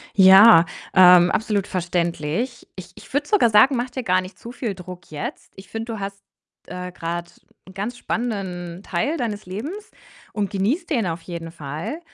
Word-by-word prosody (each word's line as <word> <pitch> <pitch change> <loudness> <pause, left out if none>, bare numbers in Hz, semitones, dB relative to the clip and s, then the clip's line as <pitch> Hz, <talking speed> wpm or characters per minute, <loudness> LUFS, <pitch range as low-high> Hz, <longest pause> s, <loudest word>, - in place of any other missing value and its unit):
Ja, 190 -1 +8 0.3
ähm, 180 -1 +7
absolut 210 -3 0
verständlich. 175 - -2
Ich 180 -1 -10
ich - - -15
würde 290 +1 0
sogar 375 - +4
sagen, 240 +6 +5
mach 245 +1 -2
dir 250 0 -5
gar 185 -2 +2
nicht 185 +1 -11
zu 235 - -10
viel 235 -5 -4
Druck 180 -1 -11
jetzt. 150 -1 -7
Ich 190 -1 -13
finde, 225 +1 -5
du 220 - -6
hast, 195 0 -6 0.5
äh, 180 0 -6
grade 170 -1 -5 0.4
'n 190 - -13
ganz 210 +6 -5
spannenden 190 -8 -4
Teil 205 - -1
deines 215 -6 -4
Lebens 295 - -6 0.4
und 205 -3 -3
genießt 235 - -1
den 235 -9 +1
auf 165 0 -4
jeden 170 -2 -7
Fall. 155 - -6
195 Hz, 175 wpm, -22 LUFS, 175-235 Hz, 0.5 s, Ja